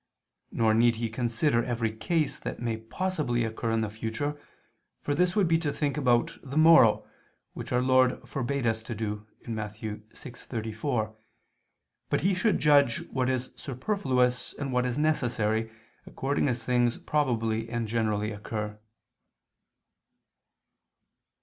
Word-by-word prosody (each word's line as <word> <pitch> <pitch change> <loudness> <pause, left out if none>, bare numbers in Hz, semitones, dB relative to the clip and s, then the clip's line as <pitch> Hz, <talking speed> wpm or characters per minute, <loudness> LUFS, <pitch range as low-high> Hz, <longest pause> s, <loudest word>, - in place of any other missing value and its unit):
Nor 110 -1 +2
need 115 +1 +4
he 115 0 -3
consider 120 +2 +1
every 115 -2 -1
case 155 +5 0
that - - -5
may 115 -2 -2
possibly 120 0 -1
occur 115 +1 -3
in 115 0 +1
the 110 - -1
future, 115 +7 -3 0.6
for 145 - -2
this 180 +5 +2
would 200 -4 +3
be 165 0 +3
to 155 -3 -1
think 145 -1 -1
about 125 -5 +1
the 140 +2 -6
morrow, 155 -9 +6 0.5
which - - -7
Our 125 0 +2
Lord 130 0 +3
forbade 135 0 -2
us 110 -1 +1
to 110 +1 -6
do 105 0 -4 0.2
(Matt. 110 -2 -4
6:34), 110 +1 -4 0.9
but - - +1
he 195 +2 +2
should 195 +3 +2
judge 145 -5 +3
what 130 -1 0
is 130 -1 -1
superfluous 130 - 0
and 135 -2 -4
what 125 0 +2
necessary, 115 -7 0 0.4
according 140 +2 -1
as 120 -3 -1
things 120 -1 +2
probably 115 -6 0
and 120 -1 -2
generally 110 -1 0
occur. 105 0 -5
120 Hz, 135 wpm, -28 LUFS, 110-140 Hz, 0.9 s, morrow